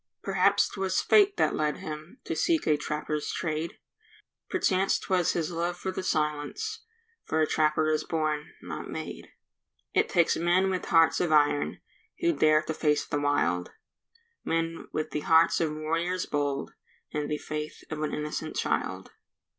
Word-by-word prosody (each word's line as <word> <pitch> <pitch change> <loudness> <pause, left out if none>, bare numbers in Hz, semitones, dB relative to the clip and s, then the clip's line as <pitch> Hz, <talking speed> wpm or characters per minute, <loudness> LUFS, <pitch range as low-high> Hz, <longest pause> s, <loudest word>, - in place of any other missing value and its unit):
Perhaps - - +3
'twas 190 -1 -1
fate 405 -2 +4
that - - +2
led 150 -1 0
him 155 +8 -8
To - - -3
seek 330 -3 +1
a 155 - +4
trapper's 150 0 -3
trade; 160 -1 -3 0.7
Perchance 195 - +2
'twas 180 -2 +1
his 170 0 -1
love 170 +1 -2
for 190 +1 -3
the 190 - -4
silence, 155 - -1 0.4
For 160 - -1
a 155 - +4
trapper 155 0 +2
is 155 0 +1
born—not 155 -2 -3
made. - - -6 0.7
It - - +2
takes 170 -1 +3
men 180 +3 +2
with 185 - -2
hearts 165 0 +4
of 175 -3 0
iron 145 -1 +2 0.4
Who 340 -1 +3
dare 155 - +4
to 160 - -3
face 150 -1 +1
the 145 - -2
wild; 90 -12 0 0.7
Men 165 0 -2
with 155 0 -3
the - - -1
hearts 165 +3 +4
of 160 -2 +1
warriors 165 +4 -1
bold, 145 -1 -2 0.4
And 150 -1 -2
the 150 - -1
faith 150 0 -6
of 155 -1 -3
an 155 - -1
innocent 150 +1 -4
child. - - -2
155 Hz, 155 wpm, -28 LUFS, 150-175 Hz, 0.7 s, fate